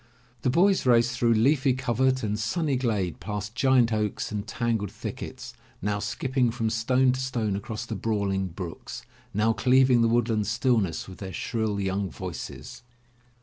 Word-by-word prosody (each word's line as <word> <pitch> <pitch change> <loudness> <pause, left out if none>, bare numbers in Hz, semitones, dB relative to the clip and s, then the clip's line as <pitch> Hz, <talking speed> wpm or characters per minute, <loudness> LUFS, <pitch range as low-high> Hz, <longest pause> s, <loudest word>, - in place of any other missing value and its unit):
The - - +1
boys 190 +8 +3
raced 120 0 +4
through 120 -1 +3
leafy 135 +3 +3
covert 130 0 +1
and 105 0 -1
sunny 145 +6 0
glade, 105 - -1
past 105 0 -5
giant 125 -3 +3
oaks 105 -1 -1
and 105 0 -4
tangled 115 -4 -1
thickets, - - -7 0.3
now 105 +1 -1
skipping 125 +4 0
from 115 -1 -1
stone 125 +3 +3
to 130 - -3
stone 120 -6 -1
across 105 +2 -5
the - - -5
brawling 100 -2 -1
brooks, 85 -1 -7 0.3
now 110 +2 +2
cleaving 130 0 +4
the 115 - +4
woodland 115 -3 +1
stillness 115 -6 +1
with 95 - -11
their 95 -2 -6
shrill 110 +2 -2
young 95 0 -1
voices. 90 -2 -7
115 Hz, 155 wpm, -26 LUFS, 105-125 Hz, 0.3 s, raced